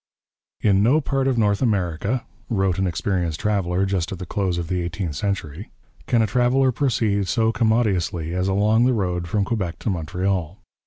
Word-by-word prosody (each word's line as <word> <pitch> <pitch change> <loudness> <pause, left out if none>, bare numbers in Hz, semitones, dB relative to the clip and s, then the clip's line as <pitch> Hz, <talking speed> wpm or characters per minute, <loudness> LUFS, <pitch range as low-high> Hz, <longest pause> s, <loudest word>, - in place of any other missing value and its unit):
'In 100 -2 +3
no 125 +9 +4
part 135 -2 -1
of 130 -2 +1
North 105 -3 +2
America,' 100 +1 0 0.2
wrote 95 -5 +1
an 95 - +1
experienced 85 -2 -1
traveller 95 -3 0
just 95 -4 -1
at 95 - -4
the 90 - -6
close 95 -1 -1
of 85 -2 -3
the 90 0 -1
eighteenth 85 -1 -3
century, 95 -1 -3 0.4
'can 115 -2 +3
a - - +3
traveller 125 +4 +2
proceed 110 -7 0
so 115 0 +2
commodiously 105 -8 0
as 90 +1 0
along 105 +4 +3
the 130 - +3
road 90 -5 -1
from 100 +2 0
Quebec 100 -7 -2
to 110 - -2
Montreal.' 90 +1 -2
100 Hz, 175 wpm, -22 LUFS, 90-110 Hz, 0.4 s, no